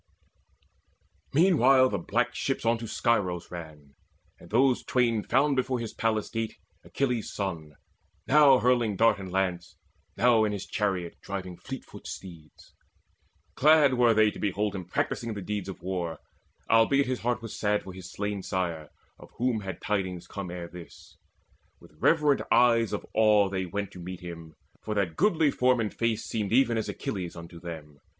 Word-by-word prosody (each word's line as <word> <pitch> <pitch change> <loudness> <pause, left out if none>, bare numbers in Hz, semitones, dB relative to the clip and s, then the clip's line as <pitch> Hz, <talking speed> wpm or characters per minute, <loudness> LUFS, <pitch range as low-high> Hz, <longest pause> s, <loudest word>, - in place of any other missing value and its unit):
Meanwhile 135 -6 +5
the 100 - -2
black 120 +8 0
ship 135 0 -2
on 115 0 +2
to 115 - -6
Scyros 95 -7 0
ran; 80 -5 -10 0.5
And 85 - -15
those 125 +3 +3
twain 120 -4 +1
found 135 +6 +2
before 130 0 0
his 115 -2 -5
palace 110 -2 0
gate 115 -1 -3 0.3
Achilles' 125 -5 -2
son, 80 -7 -4 0.5
now 145 -2 +6
hurling 120 -4 +2
dart 115 +1 +3
and 95 -2 -7
lance, 90 -2 -2 0.4
Now 120 -2 +4
in 105 -1 0
his 100 -1 -5
chariot 95 -5 -2
driving 95 -2 -6
fleetfoot 135 +8 -9
steeds. 85 -5 -11 0.8
Glad 150 -2 +5
were 120 -2 +4
they 110 -1 +4
to - - -11
behold 105 +1 -1
him 95 -3 -5
practising 115 +5 -2
The 100 - -5
deeds 100 0 -4
of 95 - -9
war, 90 -3 -3 0.5
albeit 115 +5 +4
his 130 -1 -2
heart 120 -1 -1
was 115 - -6
sad 105 0 0
For 95 - -9
his 90 -1 -10
slain 105 -1 -3
sire, 85 -6 -3 0.3
of - - -14
whom 120 -2 0
had 95 -3 -7
tidings 95 -4 -2
come 100 -3 -6
Ere 85 -1 -6
this. 85 -1 -13 0.6
With - - -18
reverent 150 -4 +3
eyes 115 -2 +4
of 105 - -4
awe 105 -2 +4
they 95 -1 -3
went 100 +3 -4
To 90 - -11
meet 90 +1 -7
him, 85 -3 -9 0.3
for 110 - -4
that 95 -6 0
goodly 160 - +3
form 125 -1 +2
and 110 -2 -2
face 115 -1 -1
Seemed 105 -3 -3
even 120 -1 +4
as 110 - -2
very - - -5
Achilles 90 -4 -4
unto 85 0 -10
them. 80 -4 -9
105 Hz, 170 wpm, -28 LUFS, 90-120 Hz, 0.8 s, now